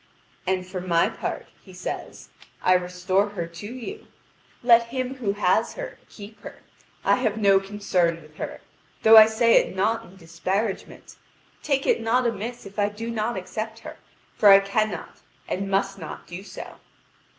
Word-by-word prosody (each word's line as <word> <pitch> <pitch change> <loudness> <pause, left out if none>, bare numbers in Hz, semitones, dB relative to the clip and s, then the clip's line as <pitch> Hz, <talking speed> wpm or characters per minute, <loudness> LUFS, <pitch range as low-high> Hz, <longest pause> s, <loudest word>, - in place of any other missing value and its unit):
"And 185 -1 0
for 185 0 -6
my 170 -2 +2
part," - - -5 0.2
he 190 - -15
says. 180 0 -7 0.3
"I 185 - +5
restore 180 +2 +1
her 185 -5 -4
to 170 +4 -9
you. 255 - -8 0.6
Let 235 -1 +6
him 255 +2 -3
who 210 -6 -1
has 205 +3 +1
her - - -7
keep 210 +1 -12
her. - - -11 0.4
I - - +4
have 220 -4 0
no 200 -2 +5
concern 190 -4 0
with 155 +1 -19
her, - - -6 0.4
though 225 0 +8
I 220 0 +11
say 230 +1 +4
it - - +1
not 220 +4 +1
in 185 - -16
disparagement. 190 +4 -4 0.4
Take 275 -2 0
it - - +2
not 240 +3 +2
amiss 235 +1 -3
if 200 +2 -8
I 205 0 +2
do 225 +3 -6
not 225 0 -2
accept 215 +4 -5
her, - - -9 0.4
for 210 - +5
I 195 0 +10
cannot 200 -2 -2 0.3
and 195 +1 -3
must 195 0 0
not 160 - -8
do 175 +2 -8
so. 200 - -10
205 Hz, 170 wpm, -24 LUFS, 185-225 Hz, 0.6 s, I